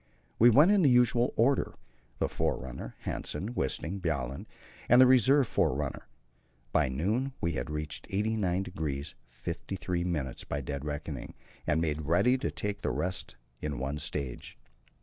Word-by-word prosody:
We 120 - +8
went 150 - +7
in 205 -2 +5
the 145 - +5
usual 125 0 +4
order 135 +5 +2 0.4
the - - +1
forerunner, 65 -2 -3
Hanssen, 100 +11 -3
Wisting, 85 - -2
Bjaaland, 70 -6 -2 0.4
and 120 - +7
the 130 - +9
reserve 130 +2 +5
forerunner. 70 -6 -1 0.6
By 75 -2 +3
noon 105 - -1
we 85 - 0
had 80 - -3
reached 75 0 -5
89° 90 -9 -1
53' 85 +8 -4 0.5
by 75 - -1
dead 70 +1 -4
reckoning, 75 -2 -5 0.3
and 80 +1 +2
made 80 -2 -1
ready 105 +10 +4
to - - -1
take 105 -1 -4
the - - 0
rest 90 -8 -2 0.3
in 75 -3 -3
one 70 +3 -3
stage. 70 -4 -5
85 Hz, 140 wpm, -30 LUFS, 75-115 Hz, 0.6 s, the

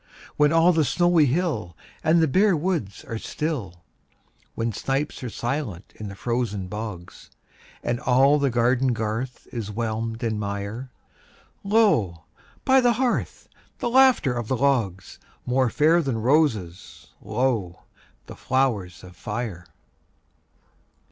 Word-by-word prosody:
When 150 0 +4
all 165 +2 +5
the 160 -1 +3
snowy 175 0 +3
hill 125 - -1 0.3
And 165 +1 +4
the - - +3
bare 190 +5 +3
woods 150 - -3
are 115 - -5
still; 110 - -4 0.7
When 115 0 -2
snipes 135 +6 -2
are 125 - -3
silent 120 - -4
in 105 - -7
the 100 - -8
frozen 115 -4 -2
bogs, 105 -3 -8 0.5
And 120 0 -1
all 135 +4 +4
the 140 -1 +2
garden 125 +2 +2
garth 115 +3 -4
is 115 -4 -5
whelmed 115 +1 -3
in 110 -2 -1
mire, 100 +5 -4 0.7
Lo, 195 - +2 0.4
by 265 0 +5
the 245 -1 +4
hearth, 245 +1 -2 0.3
the 240 - -2
laughter 260 - +5
of 120 -2 -4
the 130 - 0
logs— 115 -9 0 0.3
More 125 0 +2
fair 160 +6 +3
than 135 -7 -2
roses, 110 - 0
lo, 115 -9 -1 0.4
the - - -10
flowers 115 -10 -1
of 90 -1 -13
fire! 105 -3 -5
120 Hz, 130 wpm, -24 LUFS, 105-150 Hz, 0.7 s, all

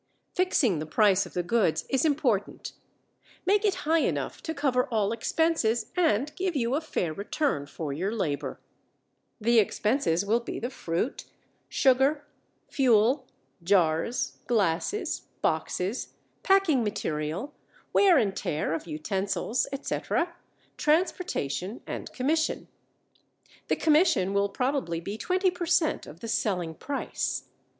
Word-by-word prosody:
Fixing 265 - +2
the 155 - -5
price 205 +1 +3
of - - -15
the 180 - 0
goods 190 -2 +1
is 270 +2 +1
important. 270 -9 0 0.7
Make 405 +3 +3
it 410 -3 +2
high 325 +2 +4
enough - - -1
to 320 - -4
cover 260 -3 +1
all 215 -4 0
expenses 235 -3 +1
and 300 - +1
give 370 -2 -1
you 240 -2 0
a 295 - +1
fair 175 - -2
return 200 - -1
for 145 -1 -5
your 185 +8 -2
labor. 165 -11 -2 0.8
The 235 +1 +4
expenses 210 - +1
will 225 +4 +2
be 235 - -6
the 240 +3 -4
fruit, 170 +4 -3 0.4
sugar, 275 +2 +3 0.4
fuel, 255 +1 +3 0.3
jars, 180 +6 +1
glasses, 230 - 0 0.2
boxes, 195 +7 -1 0.3
packing 385 -10 +3
material, 165 - -3 0.4
wear 380 -5 +6
and 205 -6 +1
tear 155 +1 -2
of 165 - -4
utensils, 195 +8 -1
etc., 335 +5 -2 0.4
transportation, 255 - 0
and - - -6
commission. 310 +5 0 1.0
The - - +2
commission 300 - +3
will 200 0 +2
probably 250 - -1
be 200 +6 -6
20 370 0 +1
per 355 -1 -5
cent 340 -2 +1
of 160 +4 -12
the 230 - -5
selling 180 -7 -1
price. 280 - -3
235 Hz, 125 wpm, -27 LUFS, 190-300 Hz, 1.0 s, wear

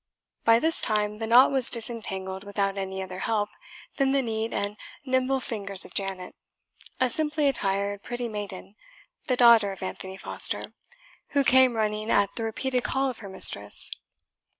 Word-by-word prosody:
By 230 0 +6
this 320 +7 +2
time 210 -1 -1
the 225 - -2
knot 245 +4 +6
was 265 -3 +2
disentangled 195 -5 -2
without 200 -1 -2
any 190 -1 -4
other 185 0 -8
help 210 0 -1 0.5
than 275 -2 +2
the 275 -1 +2
neat 225 -1 -3
and 205 +1 -3 0.3
nimble 260 0 +1
fingers 200 -6 -1
of - - -13
Janet, 195 -2 -3 0.7
a 255 - +3
simply 300 +2 +1
attired 200 -5 0
pretty 240 +2 -4
maiden, 205 -3 -7 0.5
the 255 - +1
daughter 235 -4 +6
of 190 - -8
Anthony 190 0 -6
Foster, - - 0 0.6
who 280 - +4
came 260 -2 +5
running 215 0 -2
at 200 -2 +2
the 230 - -3
repeated 250 +3 -2
call 270 0 0
of 240 - -13
her 200 -3 -9
mistress. 105 - +2
220 Hz, 160 wpm, -26 LUFS, 195-250 Hz, 0.7 s, By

